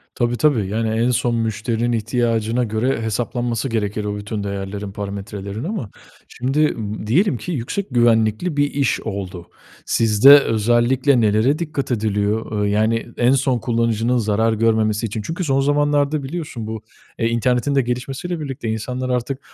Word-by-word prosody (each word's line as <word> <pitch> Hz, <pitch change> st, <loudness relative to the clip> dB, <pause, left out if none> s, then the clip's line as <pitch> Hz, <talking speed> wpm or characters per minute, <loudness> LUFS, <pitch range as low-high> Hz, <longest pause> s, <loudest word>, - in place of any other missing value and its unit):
Tabi 120 Hz, -1 st, 0 dB
tabi. 125 Hz, -11 st, +2 dB
Yani, 110 Hz, +2 st, -1 dB
en 115 Hz, +3 st, +1 dB
son 120 Hz, 0 st, 0 dB
müşterinin 115 Hz, +1 st, -1 dB
ihtiyacına 115 Hz, 0 st, 0 dB
göre 115 Hz, +2 st, -1 dB
hesaplanması 120 Hz, +2 st, -2 dB
gerekir 105 Hz, -2 st, -2 dB
o 105 Hz, 0 st, -3 dB
bütün 105 Hz, 0 st, -4 dB
değerlerin, 100 Hz, 0 st, -5 dB
parametrelerin 100 Hz, +1 st, -6 dB
ama 170 Hz, -, -4 dB, 0.4 s
şimdi 135 Hz, +4 st, -2 dB, 0.2 s
m 105 Hz, -1 st, -5 dB
diyelim 145 Hz, -, +2 dB
ki 180 Hz, -, -6 dB
yüksek 165 Hz, -, -3 dB
güvenlikli 120 Hz, +6 st, +2 dB
bir 145 Hz, 0 st, +1 dB
iş 140 Hz, -4 st, +1 dB
oldu. 95 Hz, -5 st, -6 dB, 0.4 s
Sizde, 115 Hz, +6 st, +7 dB
özellikle 120 Hz, +3 st, +2 dB
nelere 110 Hz, +8 st, +2 dB
dikkat 150 Hz, -5 st, -3 dB
ediliyor? 105 Hz, -1 st, -1 dB
Eee, -, -, +1 dB
yani 110 Hz, +2 st, +1 dB
en 120 Hz, +2 st, +3 dB
son 130 Hz, -2 st, +2 dB
kullanıcının 115 Hz, +1 st, 0 dB
zarar 110 Hz, 0 st, +1 dB
görmemesi 110 Hz, 0 st, +1 dB
için. 110 Hz, 0 st, -4 dB
Çünkü 165 Hz, -, -4 dB
son 135 Hz, -3 st, +1 dB
zamanlarda 145 Hz, +1 st, +1 dB
biliyorsun 135 Hz, -7 st, -5 dB
bu, 110 Hz, -1 st, -5 dB, 0.4 s
eee, 115 Hz, -, +2 dB
internetin 125 Hz, +3 st, +1 dB
de 135 Hz, -, +4 dB
gelişmesiyle 135 Hz, +8 st, -4 dB
birlikte 135 Hz, -6 st, -5 dB
insanlar 125 Hz, +4 st, -3 dB
artık 125 Hz, +2 st, -2 dB
115 Hz, 150 wpm, -20 LUFS, 110-130 Hz, 0.4 s, Sizde